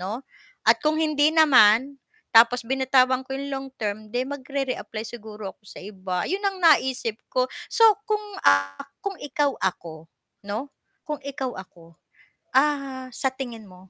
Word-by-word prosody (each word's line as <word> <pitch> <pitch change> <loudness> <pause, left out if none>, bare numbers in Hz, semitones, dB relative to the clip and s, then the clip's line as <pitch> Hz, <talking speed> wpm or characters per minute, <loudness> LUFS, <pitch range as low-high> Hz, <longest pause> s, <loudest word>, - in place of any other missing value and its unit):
'no, 215 +8 -5 0.4
at - - +5
kung 305 +1 +2
hindi 305 -1 +3
naman 275 -4 +5 0.3
tapos 235 +1 +6
binatawan 260 0 +3
ko 265 - -8
'yong 280 +1 -5
long-term 260 -6 -4
'di 250 +1 0
magre-re-apply 270 -5 -4
siguro 215 -3 -8
ako - - -50
sa - - -14
iba. 185 -2 -4
'Yon 385 +3 -1
ang 390 -1 0
naisip 265 -9 +3 0.2
ko 255 - +2 0.3
so, 455 -1 +4 0.2
kung, 425 -1 0 0.3
ah, 95 0 +2 0.2
kung 400 -1 -3
ikaw 290 0 0
ako 165 -3 -4 0.4
'no 220 +8 -5 0.3
kung 300 -1 -5
ikaw 270 -2 -4
ako, 175 -3 -13 0.6
ah, 270 -2 +1
sa 260 - -1
tingin 240 -5 -7
mo, 185 0 -17
260 Hz, 145 wpm, -24 LUFS, 210-280 Hz, 0.6 s, tapos